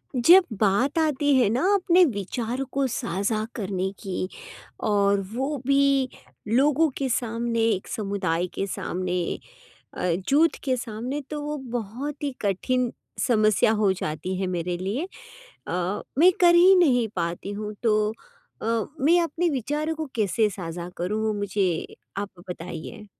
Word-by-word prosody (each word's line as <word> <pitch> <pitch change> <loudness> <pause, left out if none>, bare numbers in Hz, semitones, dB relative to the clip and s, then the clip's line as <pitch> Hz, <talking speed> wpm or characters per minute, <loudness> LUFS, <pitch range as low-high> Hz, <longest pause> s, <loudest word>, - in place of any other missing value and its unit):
जब 345 +10 +7 0.2
बात 220 +9 +2
आती 295 -2 +2
है 245 -6 +4
ना 240 +4 0
अपने 365 -2 +5
विचारों 235 - -3
को 275 0 +1
साझा 215 -1 -1
करने 190 -3 -2
की 185 -1 -2 0.6
और 200 -1 +3
वो 270 +5 -1
भी 275 -1 +3 0.4
लोगों 285 +7 +3
के 270 -1 -1
सामने, 235 -1 -1
एक 220 -4 +1
समुदाय 190 -5 -1
के 195 - -2
सामने 180 -1 -2 0.7
अ, - - -7 0.3
जुट 315 +4 +4
के 260 -2 +1
सामने 245 +4 -4
तो 300 -1 -3
वो 300 +1 -3
बहुत 245 +6 -4
ही 285 -1 -1
कठिन 240 +5 0 0.4
समस्या 215 -2 +4
हो 200 -3 +4
जाती 180 +1 -4
है 190 - 0
मेरे 175 -1 -2
लिए 200 - -2 0.6
अ, 180 +3 -1 0.2
मैं 355 +4 +7
कर 345 -1 +7
ही 360 +3 +7
नहीं 255 -10 +4
पाती 170 +2 -3
हूँ। 210 +1 -5
तो 215 -2 +2 0.5
अ, - - -3 0.3
मैं 330 +6 +5
अपने 335 +2 0
विचारों 295 +4 -2
को 315 0 -4
कैसे 215 0 +2
साझा 175 -2 -6
करूँ? 210 +5 -2
वो 215 - +1
मुझे 200 -4 -1 0.2
आप 200 0 -3 0.2
बताइए। 180 +5 -7
225 Hz, 145 wpm, -25 LUFS, 195-275 Hz, 0.7 s, जब